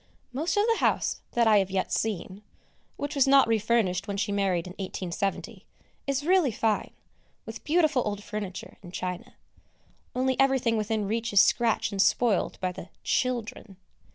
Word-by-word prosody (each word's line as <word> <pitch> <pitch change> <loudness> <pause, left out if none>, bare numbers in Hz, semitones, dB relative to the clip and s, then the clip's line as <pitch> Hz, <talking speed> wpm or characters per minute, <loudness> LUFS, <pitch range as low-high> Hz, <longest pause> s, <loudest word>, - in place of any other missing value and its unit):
Most 325 +8 -1
of 410 - +4
the 455 -1 +2
house - - 0
that 235 -1 +3
I 215 -2 +6
have 190 -1 -1
yet 190 -1 -2
seen, 200 -2 -2 0.6
which 285 +1 -4
was 275 -2 +3
not 275 -1 +6
refurnished 215 -4 +1
when 200 -1 -3
she 205 0 -1
married 195 -4 0
in 180 - -8
1870, 190 0 -4 0.4
is 275 +1 -1
really 355 -6 +3
fine, 220 -1 0 0.6
with 225 0 -8
beautiful 310 -4 +2
old 205 -1 -4
furniture 205 -3 -6
and 175 -3 -11
china; 185 +7 -5 0.8
only 260 0 0
everything 265 -4 +3
within 215 -1 -1
reach 230 +2 -2
is 200 - +6
scratched 235 -2 +2
and 195 -1 0
spoilt 220 -2 +2
by 185 -1 -1
the 180 0 -10
"children." 230 -5 -2
220 Hz, 160 wpm, -27 LUFS, 195-255 Hz, 0.8 s, I